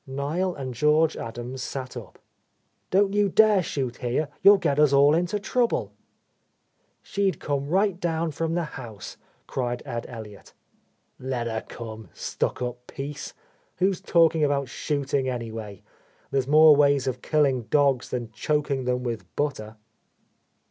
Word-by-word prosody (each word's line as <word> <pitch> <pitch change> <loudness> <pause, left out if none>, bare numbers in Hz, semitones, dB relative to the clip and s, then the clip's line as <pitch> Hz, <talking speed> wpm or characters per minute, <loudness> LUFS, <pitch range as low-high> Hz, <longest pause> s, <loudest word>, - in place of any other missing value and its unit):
Niel 150 +7 -2
and 130 -3 -5
George 150 +5 +3
Adams 120 +3 -6
sat 130 0 -5
up. 115 -6 -9 0.7
"Don't 195 +1 +3
you 205 -1 +3
dare 215 0 +5
shoot 130 -7 -3
here, 130 +5 -1
you'll 200 +1 +8
get 145 -6 0
us 150 -2 +5
all 140 +1 +6
into 175 +5 0
trouble." 240 +3 0 1.1
"She'd 195 -6 -1
come 140 -1 -2
right 190 +2 +1
down 165 -2 -1
from 165 +2 -2
the 175 - 0
house," 120 -9 -8 0.3
cried 120 -1 -3
Ed 120 -4 -5
Elliott. 110 -4 -10 0.6
"Let 130 -2 -3
her 110 -1 -3
come, 110 -4 -8
stuck - - -2
up 125 0 -6
piece! 145 +1 -7 0.4
Who's 190 0 +1
talking 165 -2 +3
about 140 -2 +1
shooting, 140 -1 -1
anyway? 110 -5 -6 0.5
There's 135 -2 0
more 155 +1 +7
ways 140 -2 +3
of 125 -2 -3
killing 140 -6 +1
dogs 140 -3 +2
than 120 -3 -4
choking 140 +3 -1
them 125 0 0
with 115 -3 -3
butter." 115 -7 -2
140 Hz, 140 wpm, -25 LUFS, 125-160 Hz, 1.1 s, you'll